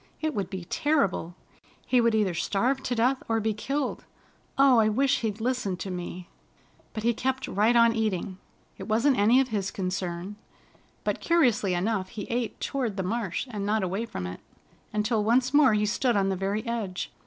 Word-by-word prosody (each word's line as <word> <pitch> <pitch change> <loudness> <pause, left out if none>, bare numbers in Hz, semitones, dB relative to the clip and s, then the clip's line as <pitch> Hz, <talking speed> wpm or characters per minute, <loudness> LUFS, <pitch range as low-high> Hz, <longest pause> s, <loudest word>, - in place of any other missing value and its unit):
"It 310 -1 -1
would 195 -6 -3
be 185 -3 -6
terrible! 195 - 0 0.5
He 250 -1 +3
would 230 -1 +3
either 205 -4 +1
starve 240 +10 0
to 245 - -2
death 250 +3 +2
or 225 0 +2
be 220 0 0
killed. 275 +6 -3 0.5
Oh, 270 -3 +6
I 215 -1 +4
wish 270 +5 +2
he'd 220 -2 -3
listened 225 -6 -1
to 195 - -4
me!" 180 0 -6 0.7
But 215 - -5
he 235 +1 +3
kept 260 +3 -2
right 215 +5 +2
on 230 -1 +6
eating. 195 -4 -2 0.4
It - - -7
wasn't 235 +4 +2
any 225 +5 +5
of 265 -1 +1
his 200 -4 -1
concern. 185 +1 -4 0.7
But - - -1
curiously 240 - +2
enough 190 +1 -1
he 215 -3 -6
ate 235 -1 -2
toward 245 -7 -2
the 190 - -1
marsh, 210 +1 -2
and 205 -3 -4
not 210 0 +1
away 195 +5 -2
from 90 - -5
it, 90 +1 -6 0.5
until 210 +1 0
once 250 +4 +2
more 285 -6 +6
he 210 0 +2
stood 235 +2 +1
on 195 -1 +2
the 190 - 0
very 200 +4 -2
edge. 220 -6 -3
220 Hz, 190 wpm, -27 LUFS, 195-245 Hz, 0.7 s, Oh